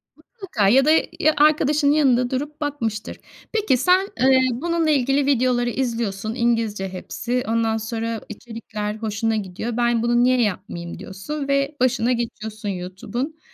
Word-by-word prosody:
Mutlaka 370 - -3
ya 265 +5 +5
da 310 - +5 0.3
ya 310 -1 +4
arkadaşının 300 -1 +4
yanında 255 -5 +3
durup 290 +4 -4
bakmıştır. 230 -8 -3 0.4
Peki, 430 - +2
sen, 365 +8 +3
eee, 260 0 +5
bununla 330 +5 0
ilgili 275 0 +2
videoları 250 -3 +2
izliyorsun. 230 -4 -2
İngilizce 225 -5 0
hepsi. 240 +6 -3
Ondan 225 0 +1
sonra 225 0 -3
içerikler 215 -1 -6
hoşuna 220 0 -1
gidiyor. 215 +4 -4
"Ben 235 -1 +2
bunu 240 0 +3
niye 255 0 +3
yapmayayım?" 180 -5 -3
diyorsun 275 +10 -6
ve 275 +1 +1
başına 245 -1 +2
geçiyorsun 220 -3 -4
YouTube'un. 200 - -5
240 Hz, 135 wpm, -22 LUFS, 220-275 Hz, 0.4 s, ya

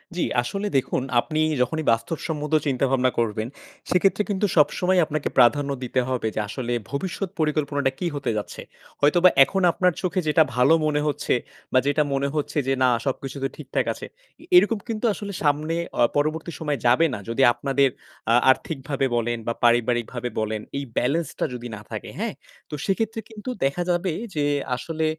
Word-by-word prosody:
জি 180 - 0 0.2
আসলে 195 +12 -3
দেখুন 130 -1 0 0.2
আপনি 155 +4 -2 0.2
যখনই 160 +5 0
বাস্তবসম্মত 150 +5 -2
চিন্তাভাবনা 130 -1 +2
করবেন, 110 0 -1 0.4
সেক্ষেত্রে 195 +3 +3
কিন্তু 205 0 +1
সবসময় 180 +4 +3
আপনাকে 155 -1 -2
প্রাধান্য 140 +3 +4
দিতে 130 +1 0
হবে 125 -3 -1
যে - - -1
আসলে 120 +2 -3 0.2
ভবিষ্যৎ 185 +6 -3
পরিকল্পনাটা 145 -3 +1
কি 180 - -1
হতে 140 - -1
যাচ্ছে। 105 - -5 0.4
হয়তোবা 175 +5 +6
এখন 195 +7 -1
আপনার 180 0 +2
চোখে 185 0 0
যেটা 155 +1 +5
ভালো 125 +6 +5
মনে 150 -1 +1
হচ্ছে 145 - 0 0.4
বা, 130 - +6
যেটা 145 +1 +3
মনে 135 +1 0
হচ্ছে 150 0 -2
যে 135 - +3
না, 125 - +5 0.2
সবকিছু 135 0 -3
তো 135 - +2
ঠিকঠাক 140 -3 -2
আছে। - - -9 0.4
এ - - -14 0.2
এরকম 225 -3 0
কিন্তু 225 +1 -2
আসলে 200 0 -6
সামনে 150 +2 +1 0.2
অ - - +4 0.2
পরবর্তী 155 +3 -1
সময় 150 -3 -1
যাবে 125 +7 +5
না। 105 - -4
যদি 115 +4 0
আপনাদের, 135 +2 +2 0.4
আ - - +5 0.2
আর্থিকভাবে 135 -1 -2
বলেন 120 0 0
বা 115 - +1
পারিবারিকভাবে 120 +1 +1
বলেন 110 0 -2 0.2
এই 140 - -2
balance 155 +7 +1
টা - - +1
যদি 120 0 -6
না 105 - -10
থাকে, - - -6
হ্যাঁ? - - -2 0.4
তো - - -11
সেক্ষেত্রে 225 +3 -1
কিন্তু 220 +2 -8 0.2
দেখা 140 +6 0
যাবে 175 0 0 0.2
যে 145 -1 +1 0.3
আসলে, 160 +4 -3
145 Hz, 170 wpm, -24 LUFS, 125-170 Hz, 0.4 s, হয়তোবা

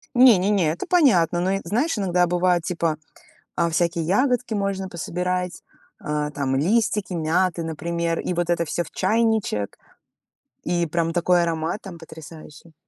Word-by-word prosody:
Не 245 -4 +7
не 185 +3 0
не, 185 -7 +2
это 170 - -5
понятно. 195 - +3
Но, 185 +2 0
э, 195 - -2
знаешь, 250 +7 0
иногда 180 -3 +1
бывает 175 0 +1
типа, 165 -3 -1 0.6
а, 170 0 +1
всякие 170 0 0
ягодки 245 - +1
можно 195 -2 -2
пособирать, 180 +1 -3 0.4
а, 150 0 -2
там 140 -2 -2
листики 205 +4 +1
мяты, 170 +2 0
например, 165 +1 -2
и 180 - -3
вот 175 0 -1
это 170 -1 +1
всё 170 +2 -2
в - - -13
чайничек. 215 - 0 0.9
И 175 0 0
прям 165 +1 -1
такой 175 0 +2
аромат 165 +3 -2
там 185 -4 -9
потрясающий. 160 0 -13
175 Hz, 155 wpm, -23 LUFS, 165-195 Hz, 0.9 s, Не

